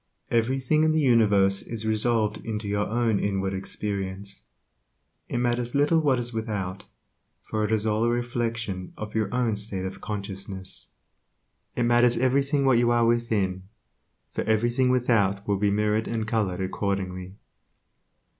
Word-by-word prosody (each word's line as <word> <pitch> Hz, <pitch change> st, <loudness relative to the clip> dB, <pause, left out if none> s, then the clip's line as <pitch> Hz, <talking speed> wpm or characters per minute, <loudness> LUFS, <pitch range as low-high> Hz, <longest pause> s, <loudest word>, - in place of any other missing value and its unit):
Everything 130 Hz, +6 st, +2 dB
in 155 Hz, 0 st, +3 dB
the 160 Hz, -, +2 dB
universe 105 Hz, -7 st, +4 dB
is 115 Hz, -2 st, -5 dB
resolved 110 Hz, -1 st, +1 dB
into 110 Hz, -2 st, -4 dB
your 105 Hz, 0 st, 0 dB
own 115 Hz, -2 st, +1 dB
inward 95 Hz, -1 st, -1 dB
experience. 100 Hz, 0 st, -5 dB, 0.8 s
It -, -, -2 dB
matters 120 Hz, 0 st, 0 dB
little 145 Hz, +3 st, +4 dB
what 140 Hz, -5 st, +2 dB
is 120 Hz, 0 st, -4 dB
without, 105 Hz, -4 st, -3 dB, 0.6 s
for 110 Hz, -1 st, -2 dB
it 105 Hz, -, -1 dB
is 110 Hz, -1 st, +1 dB
all 110 Hz, +1 st, +1 dB
a -, -, +3 dB
reflection 120 Hz, -5 st, -2 dB
of 105 Hz, -1 st, -6 dB
your 110 Hz, -3 st, 0 dB
own 120 Hz, -3 st, +1 dB
state 100 Hz, -2 st, -4 dB
of 95 Hz, +1 st, -6 dB
consciousness. 100 Hz, -2 st, -5 dB, 0.9 s
It 120 Hz, -, +1 dB
matters 120 Hz, 0 st, +4 dB
everything 135 Hz, +3 st, +2 dB
what 130 Hz, -3 st, +5 dB
you 120 Hz, 0 st, +3 dB
are 120 Hz, -1 st, +3 dB
within, 105 Hz, -5 st, 0 dB, 0.6 s
for -, -, -1 dB
everything 120 Hz, +4 st, +2 dB
without 110 Hz, -6 st, +2 dB
will 100 Hz, -1 st, +2 dB
be 100 Hz, +1 st, +2 dB
mirrored 105 Hz, +2 st, +1 dB
and 115 Hz, -1 st, -2 dB
colored 105 Hz, -5 st, 0 dB
accordingly. 95 Hz, -1 st, -3 dB
110 Hz, 145 wpm, -26 LUFS, 100-120 Hz, 0.9 s, what